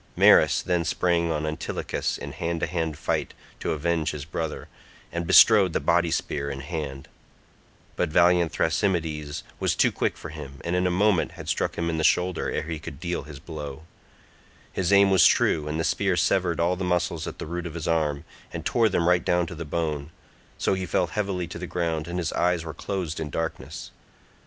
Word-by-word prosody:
Maris -, -, +6 dB
then 90 Hz, -2 st, +1 dB
sprang 85 Hz, +1 st, +1 dB
on 75 Hz, -1 st, -1 dB
Antilochus 75 Hz, 0 st, -3 dB
in -, -, -7 dB
hand 85 Hz, 0 st, -3 dB
to -, -, +2 dB
hand 80 Hz, -4 st, -2 dB
fight -, -, -2 dB, 0.2 s
to -, -, -2 dB
avenge 80 Hz, +1 st, 0 dB
his 75 Hz, -1 st, -5 dB
brother, 80 Hz, 0 st, -4 dB, 0.4 s
and 85 Hz, -1 st, -3 dB
bestrode 100 Hz, -4 st, +7 dB
the -, -, +1 dB
body 85 Hz, 0 st, +2 dB
spear 70 Hz, -2 st, -2 dB
in 70 Hz, -1 st, -5 dB
hand; 70 Hz, -3 st, -5 dB, 0.9 s
but 90 Hz, -, 0 dB
valiant 85 Hz, +1 st, +4 dB
Thrasymedes 80 Hz, -4 st, -1 dB, 0.2 s
was -, -, +1 dB
too -, -, +3 dB
quick -, -, -1 dB
for 80 Hz, -, -8 dB
him, 75 Hz, -3 st, -9 dB
and 85 Hz, +1 st, 0 dB
in 90 Hz, 0 st, +2 dB
a -, -, +2 dB
moment 95 Hz, -1 st, +2 dB
had -, -, -10 dB
struck -, -, -1 dB
him 85 Hz, -, -1 dB
in 80 Hz, -1 st, -1 dB
the -, -, 0 dB
shoulder 90 Hz, +2 st, +2 dB
ere -, -, -2 dB
he 80 Hz, 0 st, -5 dB
could 75 Hz, -2 st, -9 dB
deal 85 Hz, -4 st, -3 dB
his 75 Hz, -2 st, -9 dB
blow; 75 Hz, -2 st, -7 dB, 0.9 s
his 95 Hz, -1 st, 0 dB
aim 100 Hz, 0 st, +6 dB
was 95 Hz, -4 st, +7 dB
true, 75 Hz, -1 st, +2 dB
and 75 Hz, +1 st, -2 dB
the -, -, +1 dB
spear 95 Hz, 0 st, +1 dB
severed 85 Hz, +1 st, +1 dB
all 85 Hz, +2 st, +2 dB
the 95 Hz, -, -4 dB
muscles 85 Hz, -3 st, 0 dB
at -, -, -6 dB
the -, -, -5 dB
root 85 Hz, +2 st, -4 dB
of 85 Hz, -, -8 dB
his 85 Hz, -, -4 dB
arm, 75 Hz, -3 st, 0 dB, 0.3 s
and -, -, -6 dB
tore 115 Hz, -2 st, +3 dB
them 85 Hz, -4 st, +1 dB
right 90 Hz, -1 st, +3 dB
down 90 Hz, 0 st, +2 dB
to 85 Hz, -, -7 dB
the 85 Hz, 0 st, -6 dB
bone, 75 Hz, -2 st, -2 dB, 0.5 s
so -, -, +1 dB
he 95 Hz, -1 st, -2 dB
fell 90 Hz, -, +2 dB
heavily 95 Hz, -1 st, -2 dB
to 85 Hz, 0 st, -8 dB
the 90 Hz, -, -5 dB
ground 80 Hz, -3 st, -2 dB
and 85 Hz, +1 st, -4 dB
his 85 Hz, -4 st, -2 dB
eyes 90 Hz, -1 st, +1 dB
were 80 Hz, -, -5 dB
closed 90 Hz, -5 st, -4 dB
in 80 Hz, -, -3 dB
darkness. 80 Hz, +2 st, -5 dB
85 Hz, 205 wpm, -25 LUFS, 80-90 Hz, 0.9 s, bestrode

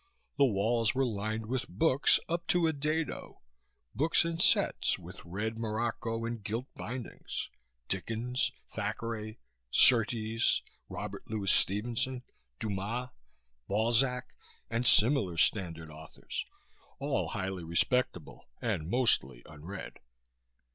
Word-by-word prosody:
The 140 Hz, 0 st, +5 dB
walls 115 Hz, +1 st, +1 dB
were 135 Hz, 0 st, +2 dB
lined 110 Hz, 0 st, -2 dB
with 130 Hz, +3 st, -2 dB
books 150 Hz, -4 st, +4 dB
up 170 Hz, +1 st, -2 dB
to 175 Hz, -1 st, +3 dB
a 160 Hz, -, +2 dB
dado 155 Hz, +2 st, -2 dB, 0.5 s
books 160 Hz, +3 st, +3 dB
in 165 Hz, 0 st, -2 dB
sets, -, -, +4 dB
with -, -, -11 dB
red 105 Hz, +6 st, -3 dB
morocco 115 Hz, 0 st, -2 dB
and 115 Hz, -2 st, -4 dB
gilt 115 Hz, +4 st, -3 dB
bindings: 125 Hz, +1 st, -5 dB, 0.4 s
Dickens, 120 Hz, -, -1 dB, 0.2 s
Thackeray, 110 Hz, 0 st, -4 dB, 0.3 s
Surtees, 115 Hz, -, +4 dB, 0.3 s
Robert -, -, -6 dB
Louis 105 Hz, -3 st, +1 dB
Stevenson, 120 Hz, +5 st, +2 dB, 0.4 s
Dumas, 110 Hz, +5 st, -3 dB, 0.6 s
Balzac 120 Hz, +4 st, +1 dB, 0.4 s
and 115 Hz, +2 st, +1 dB
similar 105 Hz, -, +5 dB
standard 85 Hz, -4 st, +1 dB
authors 80 Hz, +1 st, -7 dB, 0.5 s
all -, -, -1 dB
highly 95 Hz, -2 st, -3 dB
respectable 85 Hz, -, 0 dB
and 80 Hz, +1 st, -2 dB
mostly 70 Hz, -, +1 dB
unread. 80 Hz, +6 st, -8 dB
115 Hz, 105 wpm, -31 LUFS, 100-125 Hz, 0.6 s, The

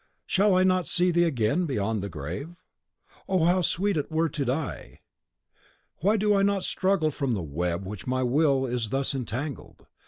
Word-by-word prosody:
Shall 195 Hz, 0 st, +3 dB
I 185 Hz, -, +4 dB
not 185 Hz, -1 st, +2 dB
see 180 Hz, 0 st, +3 dB
thee 175 Hz, 0 st, +3 dB
again 145 Hz, +4 st, +1 dB
beyond 110 Hz, -5 st, -1 dB
the 100 Hz, -, -4 dB
grave? 90 Hz, -, -6 dB, 0.7 s
O 185 Hz, -4 st, +2 dB
how 180 Hz, +2 st, +3 dB
sweet 195 Hz, +2 st, +1 dB
it 150 Hz, -, -3 dB
were 160 Hz, +1 st, +1 dB
to 145 Hz, 0 st, -3 dB
die! 135 Hz, +4 st, -4 dB, 1.0 s
"Why 205 Hz, +6 st, +2 dB
do 210 Hz, 0 st, +2 dB
I 200 Hz, -, +3 dB
not 200 Hz, -1 st, +1 dB
struggle 185 Hz, -5 st, +1 dB
from 140 Hz, -3 st, -2 dB
the 95 Hz, -5 st, -2 dB
web 85 Hz, +5 st, -2 dB
in -, -, -8 dB
which 105 Hz, +3 st, -8 dB
my 130 Hz, 0 st, 0 dB
will 135 Hz, +1 st, +2 dB
is 120 Hz, -3 st, -2 dB
thus 135 Hz, +3 st, 0 dB
entangled? 130 Hz, +2 st, -5 dB
145 Hz, 185 wpm, -26 LUFS, 120-180 Hz, 1.0 s, I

